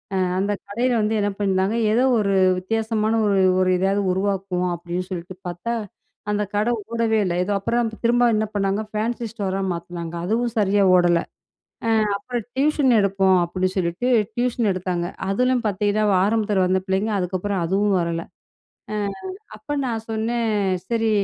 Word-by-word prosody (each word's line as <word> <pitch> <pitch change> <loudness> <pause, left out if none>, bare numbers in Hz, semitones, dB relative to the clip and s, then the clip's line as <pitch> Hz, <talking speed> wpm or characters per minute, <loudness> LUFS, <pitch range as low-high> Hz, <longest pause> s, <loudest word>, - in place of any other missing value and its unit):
அ - - +1 0.2
அந்த 200 +2 0 0.2
கடையில 240 +5 0
வந்து 215 +1 0
என்ன 205 - +1
பண்ணியிருந்தாங்க. 195 +1 +1
ஏதோ 235 +4 +3 0.2
ஒரு 200 -2 +1 0.3
வித்தியாசமான, 220 +2 -1
ஒரு 200 -1 +2 0.2
ஒரு 185 0 +3
எதாவது 195 +2 +1
உருவாக்குவோம் 190 -1 -1
அப்டின்னு 175 +2 -5
சொல்லிட்டு 180 +1 -6
பாத்தா, 175 +7 -3 0.6
அந்த 210 0 0
கட 210 +3 +2 0.2
ஓடவே 230 -1 +1
இல்ல. 180 - -1
ஏதோ, 195 - -3
அப்புறம் 235 +3 0
திரும்ப 240 +1 +3
என்ன 215 0 +1
பண்ணாங்க 200 0 0
ஃபேன்சி 230 +3 -2
ஸ்டோரா 195 -4 -3
மாத்துனாங்க. 170 -1 -6
அதுவும் 230 +4 0
சரியா 205 -1 +3
ஓடல. 175 -1 +4 0.9
ஆ - - +1
அப்புறம் 235 +2 -4
"டியூஷன் 280 -2 +3
எடுப்போம்" 195 -1 +3
அப்டின்னு 185 +2 -1
சொல்லிட்டு 180 +6 -1 0.3
டியூஷன் 240 -3 0
எடுத்தாங்க. 180 -1 -2 0.2
அதுலயும் 250 +4 +1
பாத்தீங்கன்னா, 205 +1 0 0.2
ஆரம்பத்தில 210 -2 +1
வந்த 185 +1 +2
பிள்ளைங்க, 195 +3 0
அதுக்கப்புறம் 185 +1 -2
அதுவும் 195 +2 +2
வரல. 170 -1 -2 0.7
அ - - -1 0.6
அப்ப 285 - -32 0.2
நான் 225 -3 -3
சொன்னேன், 225 +1 -1 0.4
சரி 225 -1 +1
205 Hz, 145 wpm, -22 LUFS, 185-225 Hz, 0.9 s, ஓடல